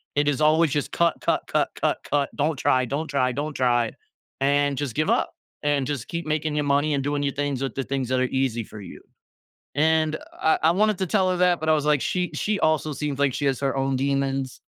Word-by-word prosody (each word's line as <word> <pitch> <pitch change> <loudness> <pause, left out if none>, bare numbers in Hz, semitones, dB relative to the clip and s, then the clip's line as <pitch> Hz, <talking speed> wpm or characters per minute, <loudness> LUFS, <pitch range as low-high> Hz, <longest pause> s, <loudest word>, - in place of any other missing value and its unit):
it 145 0 +2
is 145 -1 +1
always 155 0 +4
just, 145 0 -1
cut, 170 -1 +2
cut, - - +1
cut, - - +1
cut, - - 0
cut, 140 -1 +1
don't 150 +2 0
try, 130 -1 +2
don't 145 +6 -3
try, 130 -3 +1
don't 150 +3 -3
try, 120 -3 +1 0.5
and 140 0 +2
just 140 -4 -3
give 155 +1 0
up, - - +1 0.3
and 145 -2 +1
just 140 -5 -4
keep 170 0 -4
making 155 0 -1
ya 150 - +1
money 145 +2 +2
and 135 - -1
doing 145 +1 -1
ya 140 - 0
things 145 -2 -2
with 135 - -3
the 135 - -2
things 135 -1 -2
that 130 0 +1
are 130 - +2 0.2
easy 120 -3 -1
for 105 0 -11
you. 95 - -11 0.7
And 155 +1 +2 0.2
I 160 - +1
I 160 - +5
wanted 210 +2 +2
to 190 - -1
tell 190 0 +2
her 180 - -1
that 180 -1 +3
but 160 - -4
I 155 - +6
was 150 -1 0
like, 150 -3 +3
she 180 -1 -1
she 210 0 0
also 155 -1 +1
seems 140 0 -3
like 140 -2 +2
she 145 - -2
has 135 -2 0
her 135 0 0
own 135 0 0
demons, 135 -1 -1
145 Hz, 240 wpm, -24 LUFS, 135-155 Hz, 0.7 s, I